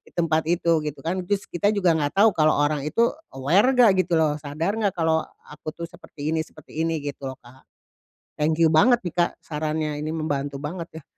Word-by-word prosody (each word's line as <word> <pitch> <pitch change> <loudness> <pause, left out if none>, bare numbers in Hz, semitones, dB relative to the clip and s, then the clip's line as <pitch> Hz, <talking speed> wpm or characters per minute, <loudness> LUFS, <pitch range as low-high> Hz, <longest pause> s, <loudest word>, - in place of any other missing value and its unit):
di - - -21
tempat 160 -2 +2
itu 170 -2 +2
gitu, 150 -1 -5
kan. 185 +3 0
Terus 200 -1 0
kita 190 +4 0
juga 195 -5 +2
enggak 150 +3 -1
tahu 220 - +5
kalau 155 -1 +4
orang 145 -1 +1
itu 235 +9 +2 0.2
aware 170 - +3
enggak 245 -5 +6
gitu 175 - -1
loh 155 -2 +2
sadar 155 +7 -2
nggak 205 -2 +2
kalau 160 -1 +2 0.2
aku, 150 +1 -8
tuh, 170 0 -5
seperti 160 -3 -7
ini, 160 - +1
seperti 155 0 -10
ini 165 -1 0
gitu 140 -1 -5
loh 130 - -9
Kak. 125 +2 -18 0.8
Thank 155 +2 0
you 165 - +7
banget, 235 +10 +5
nih, 175 -3 -6
Kak 175 0 +1
sarannya 155 0 -3
ini 155 +1 -3
membantu 145 -3 -3
banget, 165 +1 -6
ya. - - -33
160 Hz, 210 wpm, -24 LUFS, 150-175 Hz, 0.8 s, you